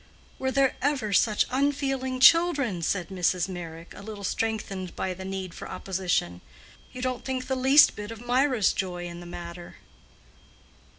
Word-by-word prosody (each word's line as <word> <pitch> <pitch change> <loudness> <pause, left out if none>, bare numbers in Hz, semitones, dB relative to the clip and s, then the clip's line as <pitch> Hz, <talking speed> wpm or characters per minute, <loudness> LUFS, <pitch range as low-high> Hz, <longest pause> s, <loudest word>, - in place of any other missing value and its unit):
"Were 265 - 0
there 270 0 +2
ever 265 -7 0
such 210 +1 +3
unfeeling 270 -1 0
children?" 280 - +5
said 180 +2 -1
Mrs. 180 -1 0
Meyrick, 170 -2 -8
a - - -10
little 205 -1 -8
strengthened 195 -3 -3
by 185 - -2
the 190 +1 -9
need 190 -2 -5
for - - -8
opposition. 180 - -2 0.5
"You 250 - -7
don't 255 -1 -2
think 260 -1 -3
the 265 0 -1
least 265 +3 +6
bit 210 0 -7
of 230 -1 -8
Mirah's 250 -3 +2
joy 180 -2 -3
in 170 0 -7
the 175 - -10
matter." 175 0 -8
210 Hz, 160 wpm, -27 LUFS, 180-260 Hz, 0.5 s, least